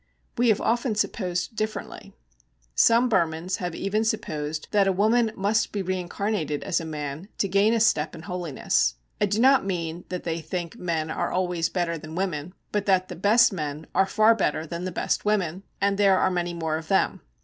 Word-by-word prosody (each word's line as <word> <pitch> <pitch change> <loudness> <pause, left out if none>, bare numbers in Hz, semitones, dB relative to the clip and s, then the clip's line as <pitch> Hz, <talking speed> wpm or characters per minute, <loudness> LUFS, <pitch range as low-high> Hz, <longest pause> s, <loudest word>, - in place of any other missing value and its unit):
We 240 0 +3
have 215 - +3
often 235 -1 0
supposed 185 0 -2
differently. 215 0 -5 0.6
Some 230 - +5
Burmans 170 -4 0
have 180 -5 -4
even 210 +3 0
supposed 155 -8 -2
that 200 -2 +3
a - - +4
woman 220 +4 +2
must 205 +3 +1
be 200 -2 -2
reincarnated 185 -3 -2
as 170 - 0
a - - -6
man 150 +2 -5
to 200 - +1
gain 200 +3 +3
a - - +2
step 160 -8 +2
in 160 - -10
holiness. 145 - 0 0.3
I 205 - +4
do 205 +2 0
not 265 +2 +5
mean 175 -3 -3
that 180 -1 -4
they 165 -1 -2
think 170 +4 -5
men 160 -3 -2
are - - -2
always 180 -3 0
better 170 -2 -1
than 155 +1 -9
women, 180 -2 -3 0.2
but 210 -1 -1
that 185 -1 +3
the 180 - -6
best 215 +5 +4
men 150 -2 -4
are 195 - +3
far 215 +3 +5
better 160 -7 -1
than 170 +2 -5
the 185 - -3
best - - -1
women, 195 -4 0 0.2
and 200 0 +1
there 195 -2 +5
are 185 - +2
many 175 -1 -2
more 160 -2 -1
of 160 0 -8
them. 195 - +1
185 Hz, 195 wpm, -25 LUFS, 165-205 Hz, 0.6 s, Some